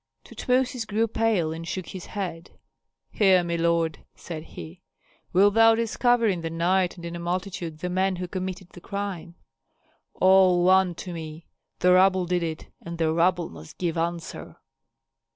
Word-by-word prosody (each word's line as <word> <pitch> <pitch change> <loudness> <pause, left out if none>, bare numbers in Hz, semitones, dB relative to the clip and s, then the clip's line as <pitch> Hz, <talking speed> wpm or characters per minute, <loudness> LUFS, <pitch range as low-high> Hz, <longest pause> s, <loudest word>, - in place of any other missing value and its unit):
Tutmosis 250 -2 -1
grew 220 +2 +1
pale, 215 -8 0
and 165 +1 -7
shook 185 -1 -5
his 185 -2 -8
head. 175 -5 -6 0.5
"Hear 190 -4 +4
me, 170 0 -2
lord," 165 -1 0
said 160 -3 -7
he; 170 +2 -11 0.5
"wilt 200 +3 +4
thou 225 +1 +6
discover 230 +1 +2
in 190 -5 +1
the 165 - -3
night 175 +2 +1
and 170 - -9
in 170 0 -5
a - - -5
multitude 175 -2 -4
the 180 - -2
men 190 +1 +1
who 180 0 -5
committed 185 0 -5
the 175 - -13
crime?" 195 -4 -5 0.8
"All 185 -1 +5
one 185 -1 +4
to 180 +1 -7
me. 160 0 -8 0.4
The 180 0 +5
rabble 185 0 +4
did 175 0 0
it, 160 -2 -4
and 170 0 -7
the 160 -1 +1
rabble 170 0 +1
must 80 - -13
give 170 -3 -2
answer." 170 0 -4
180 Hz, 165 wpm, -25 LUFS, 170-190 Hz, 0.8 s, thou